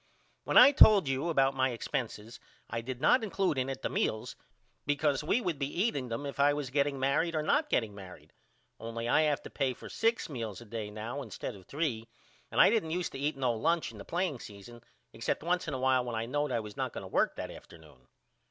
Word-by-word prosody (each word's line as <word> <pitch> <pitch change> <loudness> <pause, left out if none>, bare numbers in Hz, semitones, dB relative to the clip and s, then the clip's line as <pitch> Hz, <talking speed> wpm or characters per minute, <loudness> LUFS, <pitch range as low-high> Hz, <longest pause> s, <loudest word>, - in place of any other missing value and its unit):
When - - +2
I 265 +3 +10
told 210 - +7
you 135 +5 -1
about 135 -4 +3
my 130 0 +1
expenses 115 -2 -4 0.3
I 115 +1 -3
did 125 +1 -6
not 240 - +4
include 195 -8 0
in 130 +1 -1
it 135 0 -6
the - - +1
meals 110 0 -2 0.5
because 145 -1 +1
we 215 +10 +1
would 175 -8 -2
be 140 - 0
eating 145 - -1
them 115 +5 -4
if 140 0 -6
I 145 +1 +4
was 145 -4 -4
getting 140 0 +1
married 145 +5 +1
or 155 - 0
not 295 - +1
getting 110 -3 0
married 95 -2 -12 0.5
only 115 +1 -5
I 120 - +4
have 150 -2 +1
to - - -10
pay 130 -3 -1
for - - -11
six 230 +1 0
meals 115 - -5
a 120 - -12
day 110 -1 -5
now 110 +6 -5
instead 120 0 -6
of 95 -2 -15
three 135 -7 -2 0.4
and - - -2
I - - +8
didn't 215 -8 +1
used 175 +2 -2
to 135 - -7
eat 145 +1 -1
no 130 -3 +1
lunch 165 +9 0
in - - -12
the - - -7
playing 175 -6 -2
season 110 +4 -11 0.3
except 115 +6 -2
once 180 +1 0
in 150 - -2
a - - -4
while 130 -1 +3
when 120 -2 -4
I 110 +1 -2
knowed 145 +4 -1
I 115 - 0
was 105 -1 -9
not - - -3
going - - -6
to - - -8
work - - +1
that - - -5
afternoon. 75 -6 -15
135 Hz, 235 wpm, -31 LUFS, 115-155 Hz, 0.5 s, I